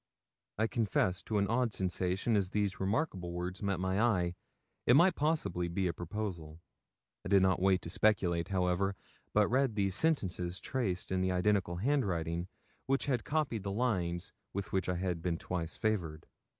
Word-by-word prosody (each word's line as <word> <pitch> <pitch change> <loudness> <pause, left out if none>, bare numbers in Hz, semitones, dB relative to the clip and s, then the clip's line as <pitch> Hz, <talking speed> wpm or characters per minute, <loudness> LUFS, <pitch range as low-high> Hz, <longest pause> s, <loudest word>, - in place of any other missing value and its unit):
I 110 - +2
confess 105 -6 0
to 110 - -2
an 100 - +3
odd 115 +1 +1
sensation 95 +4 0
as 100 -3 +1
these 100 -2 -1
remarkable 95 - -1
words 90 +1 -4
met 100 -3 -1
my 95 +2 0
eye. 90 -7 +2 0.5
It 120 - +7
might 175 +5 +6
possibly 150 - 0
be 95 +3 -1
a 85 - 0
proposal. 85 -4 -5 0.6
I - - -5
did 100 -1 +5
not 95 -1 +2
wait 95 -1 +3
to - - -5
speculate, 90 -5 +2
however, 95 0 +1 0.4
but 105 -1 +4
read 130 -1 +1
these 100 -2 +1
sentences 95 - 0
traced 100 -11 -2
in 95 0 +1
the 95 0 +1
identical 90 -1 +1
handwriting 90 - 0 0.4
which 135 +1 +1
had 125 -6 0
copied 145 -8 -1
the 100 +1 -3
lines 90 -7 -1 0.2
with 100 0 -4
which 95 -1 0
I 90 - +1
had 90 -2 -2
been 85 -1 -1
twice 85 -2 -4
favoured. 85 -8 -1
95 Hz, 170 wpm, -33 LUFS, 90-110 Hz, 0.6 s, It